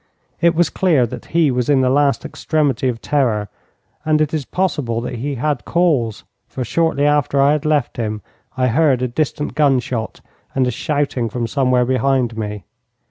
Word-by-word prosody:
It 170 Hz, 0 st, +4 dB
was 170 Hz, -3 st, +2 dB
clear 160 Hz, -10 st, +2 dB
that 115 Hz, -, -8 dB
he 165 Hz, -4 st, +2 dB
was 125 Hz, 0 st, -1 dB
in 140 Hz, -2 st, +4 dB
the 130 Hz, -, +2 dB
last 140 Hz, 0 st, +2 dB
extremity 150 Hz, -4 st, 0 dB
of 120 Hz, -2 st, -2 dB
terror, 115 Hz, -8 st, 0 dB, 0.5 s
and 155 Hz, -1 st, +2 dB
it 155 Hz, 0 st, 0 dB
is 150 Hz, -4 st, -2 dB
possible 145 Hz, -11 st, -1 dB
that 125 Hz, 0 st, -5 dB
he 140 Hz, +4 st, -3 dB
had 140 Hz, +1 st, -1 dB
cause, 145 Hz, -, 0 dB, 0.2 s
for 130 Hz, -, -5 dB
shortly 145 Hz, +3 st, +1 dB
after 145 Hz, -1 st, +2 dB
I 140 Hz, +1 st, +5 dB
had 150 Hz, 0 st, -1 dB
left 150 Hz, -5 st, 0 dB
him 110 Hz, -3 st, -3 dB, 0.3 s
I 130 Hz, -, +2 dB
heard 130 Hz, 0 st, +2 dB
a -, -, +1 dB
distant 150 Hz, +3 st, -2 dB
gunshot 130 Hz, -6 st, 0 dB, 0.3 s
and 130 Hz, -1 st, +2 dB
a 125 Hz, -, 0 dB
shouting 140 Hz, -3 st, -1 dB
from 120 Hz, +1 st, -3 dB
somewhere 125 Hz, 0 st, +1 dB
behind 130 Hz, -2 st, +1 dB
me. 105 Hz, -2 st, -5 dB
135 Hz, 180 wpm, -19 LUFS, 120-150 Hz, 0.5 s, I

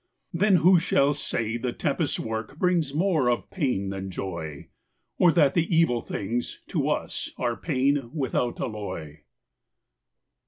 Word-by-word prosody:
Then 195 Hz, +3 st, +4 dB
who 180 Hz, +1 st, +6 dB
shall 145 Hz, -3 st, +2 dB
say 115 Hz, -4 st, -2 dB
the 125 Hz, +1 st, -2 dB
tempest's 150 Hz, 0 st, -1 dB
work 110 Hz, +4 st, -4 dB
Brings 170 Hz, -5 st, +1 dB
more 155 Hz, -4 st, +2 dB
of 120 Hz, -, -1 dB
pain 125 Hz, -, -1 dB
than 95 Hz, 0 st, -5 dB
joy; 85 Hz, -6 st, -6 dB, 0.5 s
Or 175 Hz, -, +6 dB
that 145 Hz, -5 st, +4 dB
the 165 Hz, -1 st, +2 dB
evil 140 Hz, -8 st, +3 dB
things, 115 Hz, +5 st, -3 dB
to -, -, 0 dB
us -, -, -2 dB
Are -, -, 0 dB
pain, 135 Hz, -1 st, 0 dB
without 130 Hz, -4 st, -1 dB
alloy? 100 Hz, -9 st, -5 dB
130 Hz, 135 wpm, -26 LUFS, 110-165 Hz, 0.5 s, who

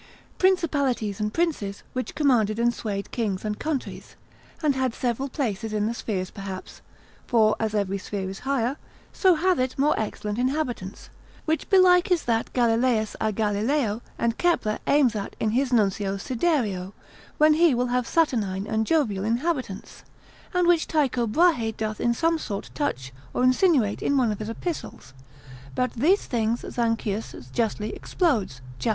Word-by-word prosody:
Principalities 280 Hz, -, +1 dB
and 210 Hz, 0 st, -1 dB
princes, 285 Hz, -13 st, -1 dB
which 255 Hz, 0 st, -4 dB
commanded 235 Hz, -8 st, +2 dB
and 235 Hz, +1 st, +2 dB
swayed 200 Hz, -4 st, -4 dB
kings 210 Hz, -5 st, -2 dB
and 210 Hz, 0 st, -3 dB
countries; 300 Hz, -4 st, -4 dB, 0.5 s
and 300 Hz, -2 st, +3 dB
had 260 Hz, -2 st, -1 dB
several 255 Hz, +2 st, -1 dB
places 225 Hz, -5 st, -3 dB
in 210 Hz, -1 st, 0 dB
the 225 Hz, -, -1 dB
spheres 190 Hz, -5 st, -3 dB
perhaps, 195 Hz, -2 st, -8 dB, 0.5 s
for 220 Hz, -3 st, +4 dB
as 220 Hz, -1 st, -1 dB
every 200 Hz, -1 st, 0 dB
sphere 190 Hz, 0 st, -4 dB
is 195 Hz, +1 st, -6 dB
higher, 265 Hz, 0 st, -1 dB, 0.4 s
so 375 Hz, -3 st, +4 dB
hath 360 Hz, +1 st, +2 dB
it 255 Hz, 0 st, -1 dB
more 290 Hz, +3 st, +3 dB
excellent 210 Hz, 0 st, -3 dB
inhabitants: 250 Hz, -7 st, -2 dB, 0.3 s
which 315 Hz, 0 st, -1 dB
belike 365 Hz, -2 st, +5 dB
is 355 Hz, -3 st, +2 dB
that 230 Hz, -1 st, 0 dB
Galilaeus 230 Hz, -2 st, +2 dB
a 220 Hz, -, +1 dB
Galileo 215 Hz, +3 st, 0 dB, 0.2 s
and 230 Hz, -1 st, -1 dB
Kepler 255 Hz, -12 st, +1 dB
aims 275 Hz, -6 st, +4 dB
at 200 Hz, -2 st, -4 dB
in 215 Hz, -, +1 dB
his 260 Hz, +3 st, +1 dB
nuncio 200 Hz, -3 st, +1 dB
Syderio, 225 Hz, -, -1 dB, 0.4 s
when 305 Hz, 0 st, +6 dB
he 320 Hz, -3 st, +4 dB
will 245 Hz, +1 st, 0 dB
have 250 Hz, -1 st, 0 dB
Saturnine 210 Hz, -, +1 dB
and 220 Hz, 0 st, -1 dB
Jovial 230 Hz, -12 st, +1 dB
inhabitants: 245 Hz, -, -2 dB, 0.5 s
and 360 Hz, -2 st, +2 dB
which 345 Hz, -2 st, +3 dB
Tycho 260 Hz, -6 st, +1 dB
Brahe 245 Hz, -4 st, +2 dB
doth 215 Hz, -1 st, -3 dB
in 235 Hz, 0 st, +2 dB
some 330 Hz, +4 st, +1 dB
sort 205 Hz, -8 st, -5 dB
touch 130 Hz, -, -3 dB, 0.2 s
or -, -, +1 dB
insinuate 255 Hz, -, +3 dB
in 280 Hz, -, +1 dB
one 245 Hz, -4 st, +3 dB
of 210 Hz, -, -4 dB
his 215 Hz, 0 st, -4 dB
epistles: 230 Hz, -, -6 dB, 0.6 s
but 250 Hz, -2 st, 0 dB
these 330 Hz, -, +2 dB
things 230 Hz, -1 st, -1 dB
Zanchius 225 Hz, -, -2 dB
justly 215 Hz, -, -1 dB
explodes, 220 Hz, -, -1 dB, 0.2 s
cap. 125 Hz, -, 0 dB
235 Hz, 160 wpm, -25 LUFS, 210-290 Hz, 0.6 s, when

